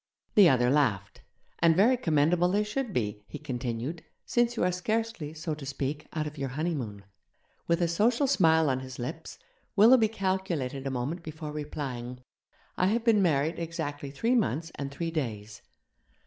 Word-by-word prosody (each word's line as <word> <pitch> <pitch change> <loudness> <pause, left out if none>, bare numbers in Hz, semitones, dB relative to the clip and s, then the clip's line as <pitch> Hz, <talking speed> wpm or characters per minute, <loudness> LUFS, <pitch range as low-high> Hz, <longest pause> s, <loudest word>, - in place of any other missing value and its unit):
The 200 -5 +7
other 125 -2 +3
laughed. 105 -10 0 0.4
'And 165 -1 +5
very 220 +8 +5
commendable 170 - +2
they 205 +3 +2
should 230 +3 -3
be,' 105 - -2
he - - -7
continued, 130 +2 -4 0.2
'since 240 0 +1
you - - +1
are 180 - +2
scarcely, 215 -3 -2
so 155 0 -3
to 150 -1 -8
speak, 140 +2 -4
out 155 -2 -2
of 150 -1 -7
your 135 -1 -2
honeymoon.' 130 -9 -3 0.6
With 170 +1 +2
a - - +3
social 230 - +2
smile 160 - +4
on 130 -2 +1
his 130 -1 -8
lips, 120 - -6 0.4
Willoughby 225 +2 +7
calculated 185 - -2
a - - 0
moment 135 +7 -3
before 155 -1 -7
replying, 130 -5 -5 0.6
'I 185 - +4
have 225 +3 +1
been 225 -3 +4
married 160 -1 +1
exactly 160 -4 -4
three 225 - 0
months 165 - 0
and 140 -1 -5
three 165 +4 -4
days.' 110 -9 -4
155 Hz, 165 wpm, -28 LUFS, 135-185 Hz, 0.6 s, The